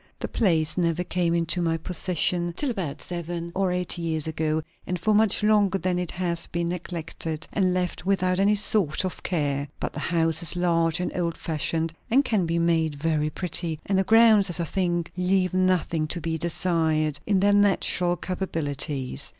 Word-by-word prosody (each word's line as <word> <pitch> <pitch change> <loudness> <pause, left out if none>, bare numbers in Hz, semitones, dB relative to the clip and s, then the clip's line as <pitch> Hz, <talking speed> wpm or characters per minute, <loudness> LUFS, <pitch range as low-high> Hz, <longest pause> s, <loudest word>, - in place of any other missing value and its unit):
The - - -3
place 165 -6 +1
never 170 0 +1
came 175 -1 0
into 170 +1 0
my 165 -1 +1
possession 175 0 -1
till 285 -4 0
about 180 -11 -4
seven 170 -1 -5
or 190 -1 0
eight 180 0 -1
years 160 -2 -1
ago; 155 0 -1 0.2
and 180 - -1
for 215 +6 +1
much 215 0 +3
longer 205 -2 +3
than 185 -1 -1
that - - 0
it 180 - -4
has 175 -2 -1
been 170 0 -2
neglected 165 -2 -5
and 185 -2 +2
left 180 -2 -2
without 185 -1 +1
any 205 +2 +4
sort 200 -5 +2
of 185 - -5
care. 145 -5 -1
But - - -3
the - - -5
house 165 -1 0
is 170 +1 -2
large 165 -2 +1
and 180 - -3
old 170 -2 -2
fashioned, 160 +1 -2 0.2
and 270 +4 +3
can 200 -8 +1
be 165 +1 0
made 165 -2 +1
very 155 0 0
pretty; 165 -1 -3
and 195 - 0
the - - +3
grounds, 220 -1 +5
as 175 - +1
I 170 - 0
think, 175 -1 -1
leave 185 0 +1
nothing 185 -4 +1
to 170 - -3
be 165 -1 -2
desired, 160 -3 0
in 200 -2 +3
their 205 +1 +3
natural 190 -3 +2
capabilities. 145 - -3
175 Hz, 185 wpm, -25 LUFS, 160-185 Hz, 0.2 s, grounds